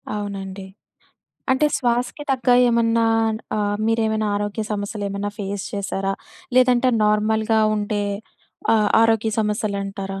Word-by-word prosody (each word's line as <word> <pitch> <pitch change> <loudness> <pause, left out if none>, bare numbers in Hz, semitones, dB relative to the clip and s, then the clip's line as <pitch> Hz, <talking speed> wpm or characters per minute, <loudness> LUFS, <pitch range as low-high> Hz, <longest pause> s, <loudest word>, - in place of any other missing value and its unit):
అవునండి. 195 -2 -5 0.9
అంటే 265 +3 +3
శ్వాసకి 245 +3 -1
తగ్గ 250 -1 -3 0.2
ఏమన్నా 230 -1 +2 0.5
ఆహ్, 205 0 0
మీరేమైనా 220 -1 +1
ఆరోగ్య 205 +1 -2
సమస్యలు 205 0 -4
ఏమన్నా 200 +1 -3
ఫేస్ 200 0 -4
చేసారా? 195 -1 -2 0.4
లేదంటే 255 0 +4
నార్మల్‌గా 220 +1 +2 0.2
ఉంటే 205 0 -1 0.7
ఆహ్, 210 -1 +2
ఆరోగ్య 225 -1 +2
సమస్యలు 210 -1 -1
అంటారా? 195 -1 -5
210 Hz, 110 wpm, -22 LUFS, 200-230 Hz, 0.9 s, లేదంటే